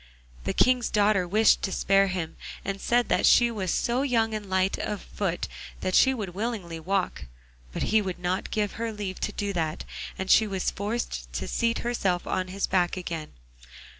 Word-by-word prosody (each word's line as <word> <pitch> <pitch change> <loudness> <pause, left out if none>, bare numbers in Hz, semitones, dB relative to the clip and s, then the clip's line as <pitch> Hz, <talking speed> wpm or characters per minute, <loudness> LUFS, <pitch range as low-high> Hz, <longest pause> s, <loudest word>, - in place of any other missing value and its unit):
The - - 0
King's 250 -1 +3
daughter 205 -3 +3
wished 215 +5 +4
to 195 - -2
spare 195 +1 +3
him, 180 -4 -3 0.3
and 195 0 -3
said 240 0 +2
that - - +2
she 240 -1 +6
was 195 -5 -3
so 240 +8 +1
young 230 -5 +1
and 210 -2 -5
light 190 0 +1
of 205 -2 -3
foot 185 -4 -2 0.3
that 185 - -1
she 265 - +6
would 215 -7 -3
willingly 195 -5 -3
walk, 180 - -1 0.5
but - - -3
he 220 - +6
would 190 -3 -4
not 180 +1 -2
give 210 -2 0
her 230 -1 -1
leave 205 -3 -5
to - - -2
do 205 -1 -3
that, 160 -3 -2 0.3
and 190 0 -1
she 220 - +6
was 190 -2 -1
forced 200 - -3
to - - -3
seat 230 0 +1
herself 195 -7 0
on 185 0 -1
his 195 +2 -1
back 180 -1 +1
again. 165 -4 -5
195 Hz, 190 wpm, -27 LUFS, 180-220 Hz, 0.5 s, she